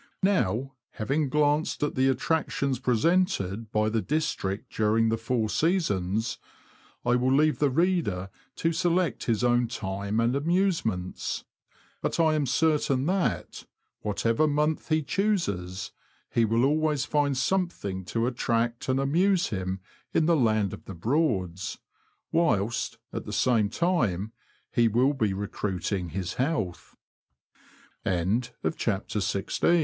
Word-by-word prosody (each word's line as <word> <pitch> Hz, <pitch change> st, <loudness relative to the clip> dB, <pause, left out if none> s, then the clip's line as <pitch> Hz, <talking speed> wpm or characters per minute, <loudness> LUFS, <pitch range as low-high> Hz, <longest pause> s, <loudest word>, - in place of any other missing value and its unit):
Now, 135 Hz, -, +1 dB, 0.2 s
having 140 Hz, +6 st, 0 dB
glanced 150 Hz, +2 st, +1 dB
at 150 Hz, -, 0 dB
the 130 Hz, +1 st, +2 dB
attractions 140 Hz, -1 st, 0 dB
presented 115 Hz, -, +1 dB
by 110 Hz, 0 st, +2 dB
the 110 Hz, 0 st, 0 dB
district 145 Hz, -10 st, -2 dB
during 110 Hz, +1 st, +2 dB
the 115 Hz, -, +1 dB
four 115 Hz, 0 st, 0 dB
seasons, 110 Hz, -, 0 dB, 0.7 s
I 120 Hz, 0 st, +3 dB
will 125 Hz, +1 st, +2 dB
leave 150 Hz, +3 st, +3 dB
the 145 Hz, -, +3 dB
reader 135 Hz, -, 0 dB, 0.2 s
to 165 Hz, 0 st, 0 dB
select 175 Hz, -1 st, +1 dB
his 115 Hz, 0 st, +1 dB
own 120 Hz, 0 st, +3 dB
time 100 Hz, -1 st, -3 dB
and 120 Hz, +3 st, +2 dB
amusements; 150 Hz, -, 0 dB, 0.6 s
but -, -, -2 dB
I 160 Hz, -2 st, +4 dB
am 150 Hz, -3 st, +1 dB
certain 140 Hz, -1 st, +2 dB
that, 185 Hz, +2 st, -1 dB, 0.3 s
whatever 115 Hz, +7 st, +1 dB
month 150 Hz, +2 st, 0 dB
he 155 Hz, -1 st, +2 dB
chooses, 100 Hz, -, -1 dB, 0.4 s
lie 115 Hz, -, +4 dB
will 115 Hz, +3 st, +2 dB
always 150 Hz, -1 st, +1 dB
find 145 Hz, -3 st, +1 dB
something 130 Hz, -, -1 dB
to 115 Hz, +4 st, -1 dB
attract 120 Hz, -1 st, -1 dB
and 130 Hz, +1 st, +2 dB
amuse 175 Hz, +7 st, +2 dB
him 95 Hz, -2 st, -3 dB, 0.3 s
in 160 Hz, -, +4 dB
the 170 Hz, +1 st, +4 dB
Land 110 Hz, -, +2 dB
of -, -, -9 dB
the 95 Hz, -, -8 dB
Broads, 95 Hz, -, 0 dB, 0.5 s
whilst, 120 Hz, -9 st, +1 dB, 0.2 s
at -, -, -4 dB
the -, -, -6 dB
same 115 Hz, -5 st, +2 dB
time, 110 Hz, -, 0 dB, 0.4 s
he 120 Hz, -1 st, +5 dB
will 125 Hz, +6 st, +3 dB
be 110 Hz, -7 st, 0 dB
re 100 Hz, +2 st, -3 dB
125 Hz, 120 wpm, -27 LUFS, 110-155 Hz, 0.7 s, he